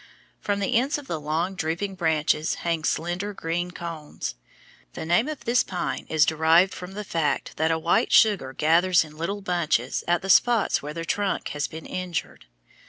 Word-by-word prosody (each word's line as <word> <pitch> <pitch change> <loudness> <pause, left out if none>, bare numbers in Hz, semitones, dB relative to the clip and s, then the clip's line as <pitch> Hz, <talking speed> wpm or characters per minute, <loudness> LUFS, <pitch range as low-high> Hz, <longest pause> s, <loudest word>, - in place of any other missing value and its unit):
From 200 -1 -1
the 195 - 0
ends 270 +6 +1
of 290 - -9
the 165 -11 -3
long, 160 +5 -1
drooping 180 +3 -2
branches 160 -3 +1
hang 165 -2 0
slender 175 +7 -2
green 175 +1 -2
cones. 165 - -6 0.6
The - - -6
name 175 - +2
of 305 -2 -6
this 240 +2 +3
pine 180 -2 -4
is 155 -1 +4
derived 160 +4 +4
from 180 +1 -8
the 210 +1 -5
fact 165 -6 -1
that 160 +1 +2
a 165 - +2
white 165 +2 +1
sugar 200 - +4
gathers 170 +5 +3
in 155 -1 -13
little 190 +6 -3
bunches 165 -9 0
at 175 0 +1
the 195 - -5
spots 235 +2 +4
where 150 +1 -7
the 165 0 -4
trunk 200 +2 -1
has 145 0 -2
been 160 0 -9
injured. 180 - -5
170 Hz, 180 wpm, -25 LUFS, 160-195 Hz, 0.6 s, is